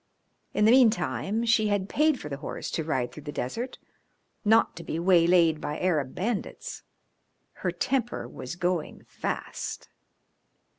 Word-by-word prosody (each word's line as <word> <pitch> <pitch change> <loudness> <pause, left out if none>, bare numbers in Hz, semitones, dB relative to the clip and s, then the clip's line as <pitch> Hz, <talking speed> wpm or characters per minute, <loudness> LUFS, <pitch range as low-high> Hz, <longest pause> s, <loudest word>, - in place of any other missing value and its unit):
In 210 - +4
the 220 - +7
meantime 230 -3 +3
she 225 -2 +4
had 205 -2 0
paid 300 +4 +2
for - - -7
the 140 -2 -4
horse - - -5
to 160 - -1
ride 130 -6 -1
through 150 - -10
the 145 - -6
desert, 225 - -4 0.7
not 220 -1 +4
to 170 - -7
be 160 - -3
waylaid 170 -2 +4
by 150 - -3
Arab 155 -8 0
bandits. 215 +3 -3 0.8
Her - - +1
temper 250 -3 -1
was 130 - -7
going 175 -2 -2
fast. - - -5
185 Hz, 145 wpm, -27 LUFS, 160-225 Hz, 0.8 s, the